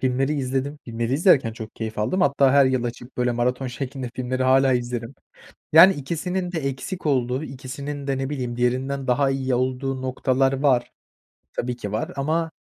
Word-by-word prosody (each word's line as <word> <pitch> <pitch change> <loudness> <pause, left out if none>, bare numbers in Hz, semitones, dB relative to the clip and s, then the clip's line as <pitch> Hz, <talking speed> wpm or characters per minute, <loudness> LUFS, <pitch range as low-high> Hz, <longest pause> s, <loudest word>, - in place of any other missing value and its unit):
filmleri 135 +3 +1
izledim, 135 +1 -2
filmleri 115 +1 -3
izlerken 140 - +4
çok 110 0 -9
keyif 110 -1 -5
aldım. 180 - 0
Hatta 140 -2 +4
her 140 -1 +6
yıl 130 -2 0
açıp, 120 +1 -7
böyle, 125 -1 +1
maraton 125 +2 -1
şeklinde 130 0 -5
filmleri 130 0 -2
hâlâ 130 +1 +4
izlerim. 120 0 -2 0.6
Yani, 180 +4 +9
ikisinin 175 +5 -3
de 165 - -2
eksik 140 +7 -4
olduğu, 130 -1 +1
ikisinin 140 +1 -6
de, 135 - 0
ne 135 0 -2
bileyim, 125 -4 -4
diğerinden 130 +2 -1
daha 135 +2 +2
iyi 135 -1 0
olduğu 130 +1 -1
noktalar 130 +1 +1
var. 130 -3 +2 0.6
Tabii 125 0 -2
ki, 105 -4 -6
var 110 +2 -2
ama 160 +4 -1
130 Hz, 170 wpm, -23 LUFS, 125-140 Hz, 0.6 s, Yani